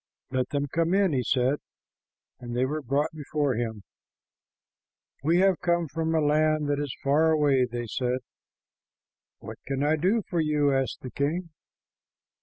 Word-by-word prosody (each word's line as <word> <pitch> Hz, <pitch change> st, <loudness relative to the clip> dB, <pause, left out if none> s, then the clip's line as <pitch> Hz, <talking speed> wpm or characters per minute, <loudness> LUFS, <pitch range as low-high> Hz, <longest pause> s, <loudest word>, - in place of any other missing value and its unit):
"Let 130 Hz, -1 st, 0 dB
them 145 Hz, 0 st, -1 dB
come 165 Hz, +5 st, 0 dB
in," 195 Hz, -5 st, +3 dB
he 130 Hz, -, +1 dB
said, 130 Hz, +3 st, +1 dB, 0.8 s
and 120 Hz, -1 st, -5 dB
the 130 Hz, -, +3 dB
were 150 Hz, +3 st, -2 dB
brought 140 Hz, +4 st, 0 dB
before 150 Hz, -2 st, -1 dB
him. 110 Hz, -3 st, -3 dB, 1.4 s
"We 165 Hz, +4 st, +3 dB
have 190 Hz, -2 st, +3 dB
come 170 Hz, -1 st, +1 dB
from 160 Hz, +3 st, -1 dB
a -, -, +4 dB
land 155 Hz, 0 st, +2 dB
that 145 Hz, 0 st, +1 dB
is 145 Hz, -3 st, -3 dB
far 150 Hz, +4 st, +3 dB
away," 145 Hz, -5 st, +3 dB
they 120 Hz, 0 st, -3 dB
said. 125 Hz, +2 st, -2 dB, 1.2 s
"What -, -, -9 dB
can 135 Hz, +1 st, -1 dB
I 155 Hz, +2 st, +2 dB
do 200 Hz, +8 st, +1 dB
for 175 Hz, -, -1 dB
you?" 150 Hz, -2 st, +2 dB
asked 135 Hz, -1 st, -1 dB
the 130 Hz, -, -7 dB
king. 165 Hz, +5 st, -2 dB
145 Hz, 160 wpm, -27 LUFS, 130-160 Hz, 1.4 s, a